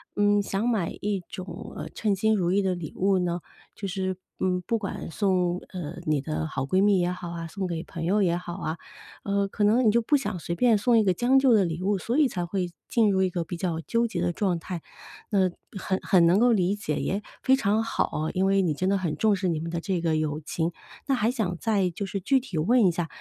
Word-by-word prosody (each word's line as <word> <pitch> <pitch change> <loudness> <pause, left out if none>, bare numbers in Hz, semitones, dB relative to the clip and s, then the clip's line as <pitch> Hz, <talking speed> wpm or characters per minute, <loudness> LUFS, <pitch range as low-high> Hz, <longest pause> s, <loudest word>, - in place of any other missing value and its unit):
嗯， 205 0 +3
想 200 +4 -1
买 205 -8 0
一 200 -2 -1
种， 180 +1 -8
呃， - - -6
称 210 -3 0
心 220 +2 +2
如 180 -3 +1
意 200 - +3
的 190 -2 0
礼 170 -4 -7
物 195 0 +2
呢， 175 -1 -1 0.3
就 200 - -6
是， 190 -1 -2 0.2
嗯， 180 -1 0
不 230 - +1
管 195 -5 -5
送， 180 -2 +1 0.2
呃， 175 -2 -5
你 150 -3 +1
的 155 +1 -3
好 140 -4 -3
闺 185 +8 +2
蜜 205 -1 +4
也 175 0 +1
好 180 -1 -6
啊， 165 -1 -5
送 190 +3 -4
给 165 -2 -3
朋 170 -2 -6
友 200 +4 +2
也 175 -2 +2
好 175 -1 -6
啊， 170 -3 -4 0.5
呃， 200 0 0
可 205 0 0
能 235 +4 +4
你 215 - +6
就 235 +2 +3
不 290 +6 +2
想 210 -9 -1
随 170 +1 -4
便 230 +3 +4
送 235 +3 +3
一 220 - +5
个 185 - +3
将 245 +8 +3
就 265 -1 +5
的 200 -4 +4
礼 165 +1 -3
物， 200 +1 +1
所 235 +7 -2
以 300 -4 +4
才 175 -5 -3
会 180 0 -2 0.2
进 225 -4 +3
入 190 -1 +2
一 185 - +2
个 175 -1 -2
比 175 +2 -6
较 165 -2 -2
纠 235 +6 0
结 175 -6 -3
的 175 0 +1
状 185 -1 0
态。 170 0 -6 0.5
那 190 -3 +3 0.3
很 190 0 -1
很 180 -3 +4
能 175 +4 +4
够 245 +1 +5
理 195 -3 +2
解， 180 -7 -3
也 200 +2 -1 0.2
非 265 - +5
常 220 -3 +1
好 225 - 0
哦， 155 +1 -2
因 185 +1 +1
为 195 0 +3
你 165 -4 +1
真 185 +6 -1
的 200 - +2
很 170 -5 -2
重 215 +4 +3
视 190 -1 -2
你 165 -3 0
们 165 - -4
的 170 0 -2
这 180 0 -2
个 165 -2 +1
友 155 0 -1
情。 165 +2 -2 0.4
那 275 - +2
还 225 -1 +1
想 215 -9 -1
再 200 -5 +1
就 200 +4 -4
是 195 +1 -3
具 265 +8 +2
体 220 -9 -6
问 215 +6 +4
一 - - +3
下， 170 0 -2
190 Hz, 275 characters per minute, -26 LUFS, 175-210 Hz, 0.5 s, 你